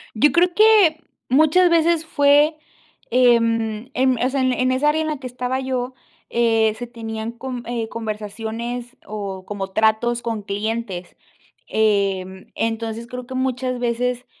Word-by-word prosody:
Yo 290 +7 +4
creo 350 +1 +3
que 415 -7 +5 0.3
muchas 315 +6 +5
veces 335 -1 +3
fue, 295 0 +4 0.5
em 230 -1 +2
em, 260 0 +2
o 255 - +3
sea, 270 0 0
en 255 0 +2
en 255 +1 +1
esa 285 +3 +3
área 310 +1 0
en 315 - -1
la 305 - -2
que 260 - -8
estaba 250 +1 -3
yo, 255 -1 -3 0.3
eh, 225 -2 +2
se 240 +2 -7
tenían 225 -1 -6
con 250 0 -6
eh, 235 -2 -3
conversaciones 225 +3 -5
o 200 -3 -6
como 195 -2 -4
tratos 220 +3 +2
con 225 -3 -3
clientes, 205 -2 -4 0.5
em, 195 -3 0
entonces 225 0 -3
creo 250 0 -7
que 260 - -8
muchas 255 -1 -1
veces 245 +1 -1
240 Hz, 150 wpm, -21 LUFS, 220-260 Hz, 0.5 s, que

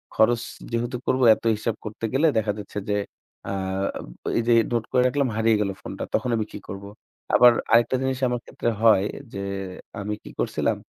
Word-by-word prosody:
খরচ 120 +1 +4 0.3
যেহেতু 120 +2 -1
করব 130 - +2
এত - - -18
হিসাব 110 +1 -2
করতে 110 +1 -5
গেলে 145 +5 +4
দেখা 110 -1 +1
যাচ্ছে 105 - -8
যে 105 - +2 0.6
আব 95 0 -2 0.3
এই - - +3
যে 120 - +5 0.2
নোট 115 - +1
করে 125 - +4
রাখলাম 135 0 +1
হারিয়ে 110 0 +3
গেলো 100 -1 -1
ফোনটা। - - -6
তখন 125 - 0
আমি 110 - 0
কি - - -7
করবো? 100 +1 -7 0.5
আবার 125 0 +8 0.2
আরেকটা 120 +2 +5
জিনিস 130 -1 0
আমার 125 0 -1
ক্ষেত্রে - - -2
হয়। 110 -4 +6 0.3
যে 100 - -4 0.6
আমি 105 +1 -3
কি - - -10
করছিলাম - - 0
115 Hz, 180 wpm, -24 LUFS, 105-125 Hz, 0.6 s, আবার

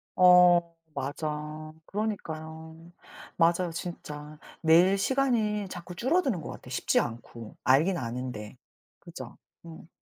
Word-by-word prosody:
어 180 -2 +6 0.2
맞아. 150 +2 -4
그러니까요. 160 -5 -5 0.5
맞아요, 170 +1 +3
진짜. 150 -3 -7 0.2
매일 175 +4 +5
시간이 220 -3 +1
자꾸 180 0 -8
줄어드는 260 - +1
것 - - -7
같아. - - -11
쉽지 125 - +1
않고. 115 -1 -6
알긴 155 +8 +4
아는데. 120 -3 -5 0.4
그죠. - - -10 0.3
음. 160 -1 -11
165 Hz, 235 characters per minute, -28 LUFS, 150-185 Hz, 0.5 s, 어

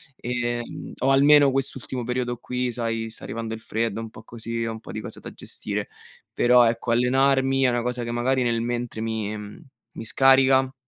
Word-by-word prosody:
e 120 -1 -2 0.4
o 135 +2 +2
almeno 145 0 +6
quest'ultimo 130 -1 -2
periodo 125 -1 -2
qui, 125 +1 -2
sai, 115 -1 -2
sta 110 - -8
arrivando 115 0 -4
il 115 - -6
freddo, 115 0 -2
un 115 - -7
po' 110 0 -13
così, 115 0 -5
ho 115 - -2
un 110 - -7
po' - - -10
di 110 - -4
cose - - -9
da - - -9
gestire. - - -4 0.4
Però, 125 0 +5
ecco, 115 +1 0
allenarmi 135 +2 +3
è 130 - +5
una 120 -1 0
cosa 125 0 -2
che 120 - -4
magari 125 +2 +1
nel 115 -1 0
mentre 120 -1 -3
mi 110 -2 -2 0.6
mi - - -6
scarica 135 +1 +4
120 Hz, 190 wpm, -24 LUFS, 115-130 Hz, 0.6 s, almeno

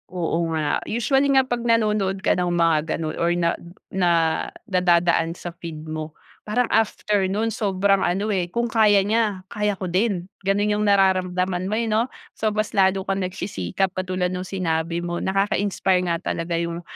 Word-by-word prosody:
Oo 170 -2 -1
nga 150 -2 0
usually 270 +5 +2
nga 265 - +5
pag 245 -2 -2
nanonood 210 -5 +1
ka - - +4
ng 180 0 0
mga 165 -2 +4 0.2
ganon 155 -1 -4
or 170 - +2
na 170 -1 +1 0.4
na 185 -2 +2 0.6
nadadaan 170 -2 +2
sa 175 - -7
feed 160 -2 -7
mo 155 0 -5 0.3
parang 245 +4 0
after 210 -2 +1
nun 220 +3 -1
sobrang 195 -1 +1
ano, 200 +4 0
eh, 180 -2 -1
kung 235 +6 -1
kaya 215 -4 +4
niya 210 -3 0
kaya 210 0 -2
ko 185 - -4
din 185 0 0 0.2
ganun 205 +2 +1
yung 210 0 0
nararamdaman 185 -1 +2
mo, 210 - 0
eh, 230 - 0
no. 225 +3 +1 0.2
So 220 - -1
mas 215 0 -2
lalo 190 -1 +2
kang 195 0 -1
nagsisikap 185 - -2
katulad 185 -1 -2
nung 180 0 -3
sinabi 170 -2 -2
mo, 175 0 -3
nakakainspire 195 -1 +1
nga 170 - +1
talaga 165 0 -3
yung 170 0 -3
190 Hz, 170 wpm, -23 LUFS, 175-210 Hz, 0.6 s, nga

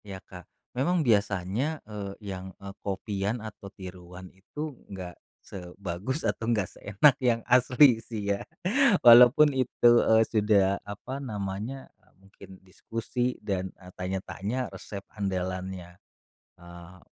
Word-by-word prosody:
Ya 100 -2 -7
Kak. 90 -3 -13 0.2
Memang 165 +7 +1
biasanya, 105 - 0
eee, 105 -2 -6 0.2
yang, 95 0 -8
eee, 100 0 -9
copy-an 100 +2 -2
atau 105 -2 -9
tiruan 90 -1 -11
itu, 150 +11 -7 0.2
enggak 90 -3 -8 0.2
sebagus 95 - -6
atau 115 - -1
enggak 105 -6 0
seenak 105 +8 +3
yang 120 -2 +2
asli 125 0 +6
sih 110 -3 -5
ya, 100 - -4 0.6
walaupun 125 +5 +8
itu, 130 -2 +3
eee, 110 0 +5
sudah 105 -3 +2
apa 105 +6 -7
namanya, 105 +2 -5 0.3
mungkin 95 0 -15
diskusi 115 +6 -3
dan, 95 -2 -2
eee, 90 -1 -14
tanya-tanya 95 +6 -3
resep 100 -1 -8
andalannya, 95 -2 -4 0.6
eee, 85 0 -13
100 Hz, 120 wpm, -27 LUFS, 95-120 Hz, 0.6 s, walaupun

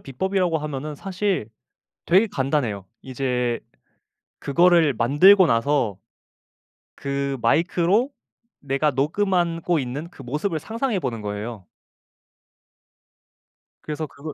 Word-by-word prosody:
비법이라고 180 +4 -1
하면은 150 0 -5
사실 190 - -2 0.6
되게 190 +6 +4
간단해요. 135 - -1 0.2
이제 125 -2 -2 0.8
그거를 170 0 +3
만들고 150 - +6
나서 115 - +1 1.0
그 140 0 -3
마이크로 175 - +2 0.5
내가 140 +2 0
녹음한 170 +4 0
고 175 0 +1
있는 140 +4 -4
그 140 -6 -13
모습을 150 +8 -2
상상해 225 - -2
보는 120 -7 -4
거예요. 105 -1 -6 2.1
그래서 155 +1 -4
그거 150 +2 -9
150 Hz, 235 characters per minute, -23 LUFS, 130-175 Hz, 2.1 s, 만들고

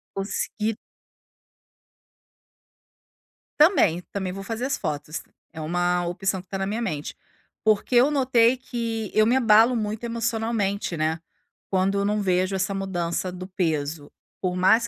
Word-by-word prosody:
Consegui 210 +2 -2 2.8
Também, 295 - +5
também 190 -2 -3
vou 195 +1 -6
fazer 225 +4 -3
as 275 +1 -1
fotos, 155 -1 -4 0.3
é 160 - -7
uma 175 +2 0
opção 190 +2 -1
que 185 - -28
tá 195 - -3
na 195 0 -2
minha 215 +4 -2
mente. 150 -10 -3 0.5
Porque 215 +3 +2
eu 255 +5 +6
notei 255 -3 +4
que 230 -4 -4
eu 215 - +5
me 235 +3 +3
abalo 230 -1 +5
muito 215 0 -3
emocionalmente, 225 -5 -1
né. 160 +1 0 0.5
Quando 195 +1 +1
eu 200 - 0
não 210 +1 +1
vejo 185 0 +1
essa 195 +1 -1
mudança 185 -2 -2
do 185 0 -7
peso. 160 -5 -2 0.3
Por 180 -1 -1
mais 220 +6 +4
195 Hz, 140 wpm, -25 LUFS, 180-230 Hz, 2.8 s, eu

